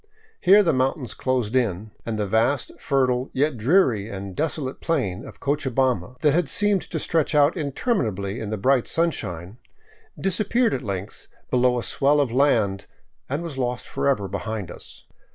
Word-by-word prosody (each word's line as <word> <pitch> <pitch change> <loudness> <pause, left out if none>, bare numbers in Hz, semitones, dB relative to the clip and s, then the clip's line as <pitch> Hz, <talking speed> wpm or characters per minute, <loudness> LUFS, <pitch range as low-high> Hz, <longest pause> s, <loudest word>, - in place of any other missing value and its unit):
Here 200 +3 +6
the 165 -4 +2
mountains 130 0 -1
closed 130 -3 -1
in, 110 -4 0 0.2
and 110 -2 -2
the 105 - 0
vast, 115 +6 +1
fertile, 130 -2 +1
yet 145 +1 +1
dreary 120 - +2
and 95 -2 -7
desolate 150 -4 -2
plain 115 - -1
of 140 - -12
Cocha 145 -1 -1
bamba, 125 -5 0
that 150 - +4
had 160 -1 +1
seemed 205 +1 +2
to - - -3
stretch 160 -2 0
out 145 +2 +4
interminably 125 - -1
in 105 - -5
the 110 - -2
brilliant 130 +4 +2
sun 170 +1 +2
shine, 90 - -7 0.6
disappeared 215 +5 +1
at 130 - -2
length 100 0 -5 0.2
below 125 0 +3
a 120 - -2
swell 145 +2 +2
of 140 -5 +1
land 115 -7 +2 0.4
and 145 +5 -2
was 155 -6 -6
lost 125 -1 -2
for - - -2
ever 105 -8 0
behind 100 -1 -4
us. - - -12
130 Hz, 170 wpm, -24 LUFS, 110-150 Hz, 0.6 s, Here